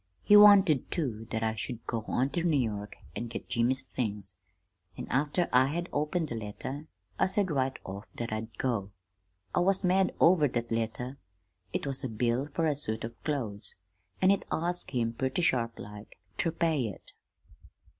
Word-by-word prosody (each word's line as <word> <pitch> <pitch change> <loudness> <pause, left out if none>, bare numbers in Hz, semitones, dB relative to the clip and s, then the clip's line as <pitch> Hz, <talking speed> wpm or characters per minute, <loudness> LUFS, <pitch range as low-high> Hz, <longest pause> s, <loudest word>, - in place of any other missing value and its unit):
He 205 - +6
wanted, 200 -9 +7
too, 115 -9 -2
that 110 0 -2
I 110 0 +1
should 115 +2 -5
go 115 -2 -2
on 130 +3 +1
ter 175 - -1
New 165 -3 +2
York 105 -4 -3 0.2
an' 120 - -3
get 115 - -6
Jimmy's 125 +3 +2
things; 105 -7 -4 0.6
an' - - -5
after 150 +6 +1
I 130 +1 +6
had 170 +5 -3
opened 150 +2 0
the - - -3
letter 130 +7 -6 0.3
I - - +4
said 190 -2 0
right 135 -2 0
off 100 +2 -7
that 115 -2 -3
I'd 110 +1 -5
go. 115 -7 -1 0.6
I - - +2
was 190 +2 +3
mad 185 +1 +3
over 165 -3 +6
that 120 -2 -3
letter. 115 +4 -2 0.5
It - - -2
was 135 -1 -2
a 130 - -2
bill 120 +4 0
fer 160 +3 -1
a 150 -2 +2
suit 110 -6 -3
of 115 +1 -8
clothes, 115 -9 -3 0.5
an' 185 - +7
it 200 - +1
asked 175 +2 -1
him 115 -3 -1
purty 130 +8 -1
sharplike 115 -6 -2 0.2
ter 165 - 0
pay 160 -6 +1
it. 100 - -10
130 Hz, 175 wpm, -30 LUFS, 115-160 Hz, 0.6 s, wanted